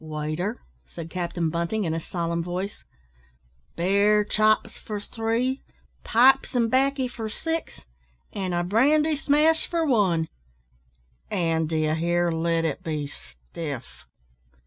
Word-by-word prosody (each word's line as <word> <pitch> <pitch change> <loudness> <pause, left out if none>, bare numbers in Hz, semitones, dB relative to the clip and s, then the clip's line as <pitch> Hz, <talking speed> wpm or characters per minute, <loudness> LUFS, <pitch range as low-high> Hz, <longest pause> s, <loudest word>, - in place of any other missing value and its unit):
"Waiter," 155 +7 -3 0.3
said 165 -1 -8
Captain 175 -2 -2
Bunting, 170 +6 -1
in 165 -3 -1
a 165 - -1
solemn 170 0 -2
voice, 180 +4 -4 0.9
"bear 200 +4 +3
chops 215 +1 +2
for 210 -1 -5
three, 230 +5 -1 0.4
pipes 265 +3 +4
and 230 -2 +2
baccy 270 0 +2
for 225 -3 -6
six, 325 +8 -4 0.5
an' 190 -2 -2
a 175 0 0
brandy 295 - +3
smash 300 +3 +2
for 335 -1 0
one; 190 - +2 1.0
an', 165 -2 0
d'ye 155 -1 +1
hear, 170 +1 +1
let 165 0 0
it 155 - -2
be 155 -3 -3
stiff!" 65 - -9
185 Hz, 125 wpm, -25 LUFS, 165-235 Hz, 1.0 s, pipes